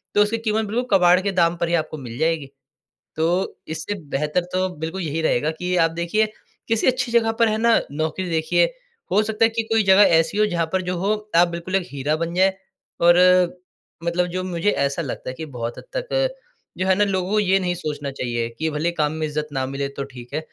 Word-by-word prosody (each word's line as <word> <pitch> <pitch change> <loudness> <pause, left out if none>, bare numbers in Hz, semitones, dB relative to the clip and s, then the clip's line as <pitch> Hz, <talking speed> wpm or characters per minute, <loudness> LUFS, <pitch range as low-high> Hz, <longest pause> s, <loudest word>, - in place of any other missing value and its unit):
तो 205 - +5
उसकी 210 +2 +2
कीमत 220 -1 0
बिल्कुल 240 +5 -2
कबाड़ 180 0 +5
के 200 +1 -1
दाम 170 -2 +2
पर 170 - +2
ही 170 - -1
आपको 155 - -8
मिल 120 -4 -8
जाएगी। 160 -3 0 0.7
तो 160 +1 +1 0.4
इससे 160 +6 -4 0.2
बेहतर 150 +5 0
तो 185 0 +1
बिल्कुल 165 +4 -4
यही 160 -1 -2
रहेगा 155 -1 +1
कि 180 0 -1
आप 165 - -1
देखिए 170 +6 +1 0.4
किसी 225 +1 +1
अच्छी 250 -2 +1
जगह 230 -1 +3
पर 230 - +6
है 215 - 0
ना 230 +1 +4
नौकरी 155 +5 -2
देखिए, 165 +1 +2 0.5
हो 210 - +4
सकता 220 +1 +2
है 225 - +3
कि 225 0 -2
कोई 225 -1 +4
जगह 190 +1 +6 0.2
ऐसी 165 +5 -1
हो 215 - +4
जहाँ 175 -5 0
पर 190 - +2
जो 180 0 -3
हो 195 +4 +1 0.2
आप 175 +1 +6
बिल्कुल 170 +2 -4
एक 185 -2 0
हीरा 145 +2 -1
बन 165 +1 -3
जाए। 190 +1 +4 0.5
और 175 0 +6 0.9
मतलब 170 +1 0
जो 185 +1 -3
मुझे 185 +2 0
ऐसा 140 +1 0
लगता 135 -4 -5
है - - -4
कि 160 - -6
बहुत 115 0 -4
हद - - -9
तक - - 0 0.4
जो 185 - -1
है 190 - +5
ना 205 - +3
लोगों 195 +1 0
ये 190 -1 +3
नहीं 180 -2 -1
सोचना 145 -3 -4
चाहिए 120 -3 -2
कि 160 0 0
भले 150 +3 0
ही - - -5
काम 150 -2 +1
में 160 0 -2
इज़्ज़त 150 0 -3
ना 135 -1 -1
मिले 140 +1 -3
तो 140 - -2
ठीक 125 +1 -11
है। 155 - 0
175 Hz, 230 wpm, -22 LUFS, 155-205 Hz, 0.9 s, पर